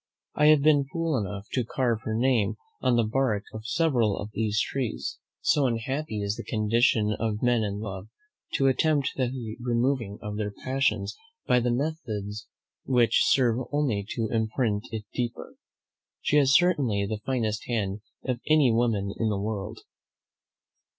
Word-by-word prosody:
I 150 - +4
have 155 -2 +6
been 145 -2 +4
fool 165 -1 0
enough 100 -3 -3
to 125 - 0
carve 115 -1 0
her 110 - -1
name 115 -3 +2 0.3
on 125 -1 +3
the 120 - +3
bark 110 -2 0
of 110 +1 -7
several 120 -8 +2
of 105 +1 -6
these 105 -1 0
trees; 130 -2 -2 0.2
so 145 -3 +3
unhappy 115 -1 -2
is 100 0 -1
the - - -5
condition 110 -1 +2
of 110 -1 -2
men 120 -2 +3
in 100 -2 -2
love, 95 -2 -6 0.5
to 135 - +2
attempt 140 +1 +2
the 125 -2 0 0.3
removing 120 -3 0
of 105 -2 -5
their 105 -1 -1
passions 110 -3 -1 0.3
by 125 - +4
the 120 0 0
methods 115 -7 -3 0.4
which 120 -3 +3
serve 125 -3 +3
only 140 -9 0
to 115 -1 0
imprint 110 -1 0
it 110 -2 -5
deeper. 120 -2 -4 0.7
She 150 - +3
has 140 -2 +4
certainly 135 - +3
the 105 +1 -4
finest 110 -5 -1
hand 105 -4 -1 0.2
of 125 -2 -1
any 150 -5 +5
woman 110 -4 +1
in 110 - +1
the 100 -2 -1
world." 105 +1 -4
115 Hz, 155 wpm, -27 LUFS, 105-130 Hz, 0.7 s, have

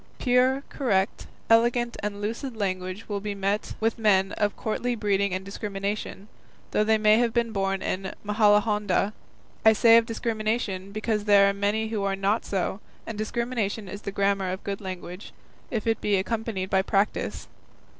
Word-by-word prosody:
Pure, 255 +2 +2
correct, 200 -8 -1 0.2
elegant 235 +1 +3
and 205 0 -4
lucid 230 +3 -4
language 185 0 -3
will 205 -1 -2
be 205 0 -4
met 200 +2 -2
with 225 +1 0
in - - -12
men 195 -2 +3
of 205 -1 -1
courtly 240 +2 -2
breeding 200 -2 +1
and 185 +1 -3
discrimination, 200 0 -4 0.4
though 210 - +2
they 220 +1 +3
may 215 +1 +5
have 240 -1 +2
been 235 -1 +1
born 195 -2 -1
in 190 +1 -2
Majalahonda; 210 -1 +2 0.5
I 220 - +7
say 230 +1 +6
of 230 0 +3
discrimination, 215 -4 -2
because 215 0 -2
there 200 -1 +6
are 200 - +2
many 205 +2 0
who 220 -2 -2
are 195 -1 0
not 195 +3 0
so, 190 0 -2 0.3
and 225 - -5
discrimination 220 -1 -2
is 200 +2 -7
the 200 - -5
grammar 195 -1 +1
of 185 - -5
good 200 0 -4
language, 185 0 -7 0.4
if 225 -4 -3
it 225 -1 0
be 205 -1 +2
accompanied 200 -1 -2
by 190 - +4
practice. 200 +1 -1
210 Hz, 170 wpm, -26 LUFS, 195-225 Hz, 0.5 s, I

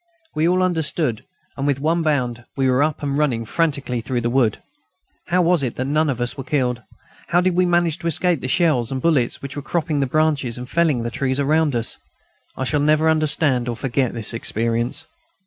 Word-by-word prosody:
We 155 +2 +1
all 185 +1 +2
understood, 160 -8 0 0.3
and 140 +1 -2
with 140 -2 +1
one 165 +4 +1
bound 125 -7 -1
we 135 -1 +2
were 130 +1 +3
up 150 0 0
and 140 -1 -1
running 130 -6 0
frantically 140 -4 -1
through 125 0 -2
the 120 0 -1
wood. 120 -5 +2 0.7
How 180 +1 +2
was 175 -2 +3
it 125 -4 -2
that 130 - -2
none 155 +2 +1
of 125 -3 -2
us 120 0 -2
were 135 - -6
killed? 125 -4 -1 0.5
How 175 - +3
did 180 0 +2
we 180 +1 +2
manage 175 -2 +1
to 170 - -3
escape 170 -1 +1
the - - -3
shells 135 -5 +1
and 135 - -2
bullets 135 -6 +1
which 140 0 -6
were 145 - -4
cropping 155 0 -1
the 135 - +1
branches 145 -4 +1
and 125 0 -7
felling 150 -5 +1
the 120 - -3
trees 130 +1 -1
around 150 0 +2
us? 115 -1 -2 0.6
I - - -2
shall 145 +3 0
never 155 +2 +3
understand 145 -5 +1
or 120 - -2
forget 130 +1 -1
this 115 -2 -2
experience. 115 +1 -1
140 Hz, 210 wpm, -21 LUFS, 125-160 Hz, 0.7 s, were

